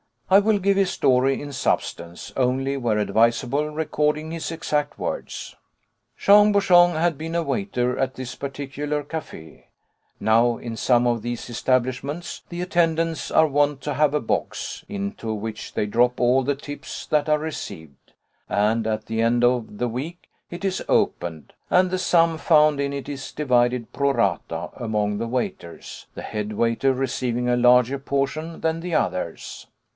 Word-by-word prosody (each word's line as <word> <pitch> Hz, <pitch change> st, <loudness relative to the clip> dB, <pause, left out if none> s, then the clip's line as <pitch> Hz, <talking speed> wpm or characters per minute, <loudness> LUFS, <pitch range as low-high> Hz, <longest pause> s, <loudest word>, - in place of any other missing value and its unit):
I 195 Hz, -, +8 dB
will 205 Hz, 0 st, +2 dB
give 195 Hz, +1 st, +2 dB
his 195 Hz, -2 st, +3 dB
story 130 Hz, -2 st, +2 dB
in 145 Hz, 0 st, -7 dB
substance, 85 Hz, -9 st, -2 dB
only 135 Hz, +1 st, +1 dB
where 115 Hz, -5 st, 0 dB
advisable 115 Hz, +7 st, +1 dB
recording 150 Hz, 0 st, -1 dB
his 165 Hz, -1 st, -4 dB
exact 150 Hz, -3 st, -2 dB
words. -, -, -5 dB, 0.6 s
Jean 205 Hz, +1 st, +6 dB
Bouchon 175 Hz, -3 st, +5 dB
had 165 Hz, -1 st, 0 dB
been 165 Hz, +1 st, -4 dB
a 170 Hz, -, +1 dB
waiter 125 Hz, -, -1 dB
at 130 Hz, 0 st, -1 dB
this 130 Hz, -1 st, -6 dB
particular 140 Hz, +2 st, -4 dB
café. 140 Hz, -, -8 dB, 0.5 s
Now 115 Hz, +2 st, +3 dB
in 115 Hz, -2 st, -6 dB
some 120 Hz, 0 st, +3 dB
of 120 Hz, -2 st, +1 dB
these 120 Hz, +1 st, -5 dB
establishments 130 Hz, +7 st, -1 dB
the 175 Hz, 0 st, -5 dB
attendants 165 Hz, -2 st, 0 dB
are 160 Hz, -, +5 dB
wont 145 Hz, -1 st, +1 dB
to 150 Hz, -, -3 dB
have 150 Hz, +1 st, +2 dB
a 150 Hz, -, +1 dB
box, 115 Hz, -, -3 dB
into 100 Hz, +3 st, -4 dB
which 110 Hz, +1 st, -6 dB
they -, -, 0 dB
drop 120 Hz, +4 st, +2 dB
all 125 Hz, +2 st, +3 dB
the 145 Hz, +2 st, 0 dB
tips 145 Hz, +1 st, -8 dB
that 150 Hz, 0 st, +1 dB
are 150 Hz, -, +4 dB
received; 100 Hz, -, -8 dB, 0.4 s
and 110 Hz, +2 st, +1 dB
at 110 Hz, -1 st, -2 dB
the 115 Hz, 0 st, -2 dB
end 120 Hz, +1 st, +2 dB
of 120 Hz, -4 st, +1 dB
the 125 Hz, -, 0 dB
week 150 Hz, +9 st, -6 dB, 0.2 s
it 175 Hz, +3 st, -8 dB
is 190 Hz, -1 st, -1 dB
opened, 80 Hz, -4 st, -1 dB, 0.2 s
and 180 Hz, 0 st, +3 dB
the 185 Hz, -, 0 dB
sum 165 Hz, -2 st, +3 dB
found 155 Hz, -3 st, +4 dB
in 140 Hz, 0 st, -1 dB
it 140 Hz, -1 st, -5 dB
is 140 Hz, -2 st, -6 dB
divided 125 Hz, -4 st, +1 dB
pro 140 Hz, 0 st, +1 dB
rata 85 Hz, -, -1 dB
among 105 Hz, -3 st, -1 dB
the 115 Hz, +2 st, -3 dB
waiters, 115 Hz, -8 st, -5 dB
the -, -, -7 dB
head 105 Hz, 0 st, -4 dB
waiter 115 Hz, +5 st, +1 dB
receiving 125 Hz, -2 st, -1 dB
a 120 Hz, -, +2 dB
larger 125 Hz, +2 st, +4 dB
portion 140 Hz, +4 st, -2 dB
than 160 Hz, 0 st, 0 dB
the 170 Hz, -1 st, -3 dB
others. 90 Hz, -, -3 dB
135 Hz, 160 wpm, -23 LUFS, 115-155 Hz, 0.6 s, I